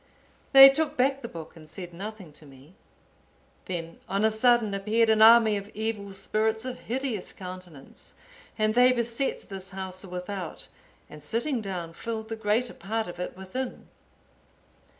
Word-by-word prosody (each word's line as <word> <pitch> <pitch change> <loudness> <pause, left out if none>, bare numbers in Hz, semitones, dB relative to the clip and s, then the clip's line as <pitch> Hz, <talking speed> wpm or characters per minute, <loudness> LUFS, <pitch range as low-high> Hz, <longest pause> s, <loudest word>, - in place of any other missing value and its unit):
They 270 -1 +12
took 300 +3 +1
back 270 +2 +2
the 235 - -5
book 165 -6 -10
and 155 -2 -14
said 180 -3 -9
nothing 195 -2 -8
to 150 - -13
me. 135 +4 -17 0.9
Then, 165 -2 -6
on 200 +2 +1
a 220 - +3
sudden, 225 -1 +3
appeared 220 +3 +2
an 220 0 +3
army 220 -1 +7
of 200 +1 -7
evil 215 -2 -3
spirits 220 +3 -1
of 255 -1 -5
hideous 245 -5 -3
countenance, 180 -6 -11 0.4
and 215 -1 +2
they 250 +2 +5
beset 240 +2 -2
this 190 -1 -7
house 190 -1 -5
without, 180 -1 -6 0.4
and 150 -1 -12
sitting 235 - -1
down 180 -5 -5
filled 220 +3 -5
the 225 - -3
greater 220 +3 0
part 220 +2 -3
of 175 0 -9
it 180 - -5
within. 215 +8 -6
215 Hz, 155 wpm, -27 LUFS, 185-230 Hz, 0.9 s, They